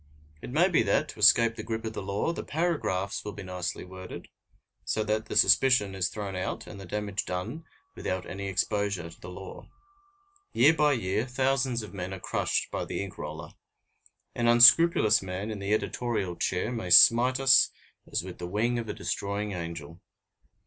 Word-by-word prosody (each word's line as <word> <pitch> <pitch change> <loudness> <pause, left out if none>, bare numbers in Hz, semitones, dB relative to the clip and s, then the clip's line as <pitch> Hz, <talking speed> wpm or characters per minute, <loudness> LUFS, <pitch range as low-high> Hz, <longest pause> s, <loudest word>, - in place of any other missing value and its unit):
It - - -8
may 160 +8 +3
be 180 - +2
that, 115 +8 +1
to - - -10
escape 110 +3 +5
the 110 - -6
grip 110 +1 -5
of 110 - -4
the - - -5
law, 100 - -2
the - - -6
paragraphs 140 - -2
will 105 - -6
be 95 - -9
nicely 90 -2 -5
worded, 95 0 -10 0.5
so 110 - -1
that 110 +1 -2
the - - -6
suspicion 105 0 +4
is 95 -2 -1
thrown 100 -3 -6
out 90 - -4
and 100 - -10
the 95 - -10
damage 105 +1 -3
done 105 - -5 0.3
without 95 -1 -4
any 100 +2 -6
exposure 95 -2 -2
to 85 - -18
the 90 - -9
law. 95 +1 -10 0.8
Year 145 +7 +5
by 150 -2 +2
year, 110 0 -1
thousands 130 -2 0
of 105 - -10
men 95 0 -5
are - - -10
crushed - - -2
by - - -3
the - - -4
ink 100 - -10
roller. - - -7 0.8
An 120 -1 -1
unscrupulous 120 -1 +6
man 95 +3 -5
in 105 - -6
the 100 +1 -4
editorial 110 -4 -1
chair 95 +6 -2
may 115 -7 -5
smite 120 +8 +6
as 130 -3 +5 0.5
with 90 -1 -9
the 85 - -5
wing 115 +6 0
of 115 -2 -6
a - - -2
destroying 100 +1 -3
angel. 85 -2 -7
105 Hz, 185 wpm, -27 LUFS, 95-120 Hz, 0.8 s, unscrupulous